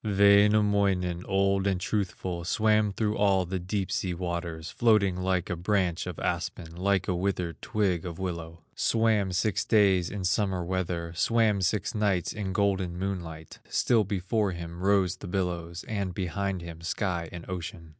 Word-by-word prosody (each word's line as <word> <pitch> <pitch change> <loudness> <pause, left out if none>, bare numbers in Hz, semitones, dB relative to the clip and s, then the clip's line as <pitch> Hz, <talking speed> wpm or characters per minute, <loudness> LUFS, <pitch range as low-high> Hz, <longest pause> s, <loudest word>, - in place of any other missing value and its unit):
Wainamoinen, 100 -3 +3
old 95 0 +2
and 95 -2 +1
truthful, 95 -3 -2
Swam 110 +3 +2
through 105 +1 -1
all 95 -2 +3
the 95 +2 -3
deep 95 +1 -2
sea 95 -2 -1
waters, 85 -2 -4
Floating 105 -6 +3
like 90 -1 0
a 90 - -2
branch 90 -1 0
of - - -5
aspen, 85 -1 -3
Like 95 +1 +1
a 95 - +1
withered 90 -2 -2
twig 100 -6 0
of 85 -2 -6
willow; 85 -3 -5
Swam 110 -4 +2
six 90 +2 0
days 95 -5 +3
in 100 -2 -5
summer 90 -1 0
weather, 85 -2 -2
Swam 105 +3 +2
six 100 +6 0
nights 100 -5 0
in 100 -3 -3
golden 95 -2 0
moonlight; 85 -5 -5
Still 115 -3 +3
before 100 +1 -1
him 85 0 -7
rose 95 -2 +2
the 95 - -9
billows, 85 -2 -3
And 100 -5 -3
behind 95 0 -2
him 85 -1 -9
sky 85 -1 -2
and 85 -1 -9
ocean. 85 -2 -6
95 Hz, 155 wpm, -28 LUFS, 85-100 Hz, -, Wainamoinen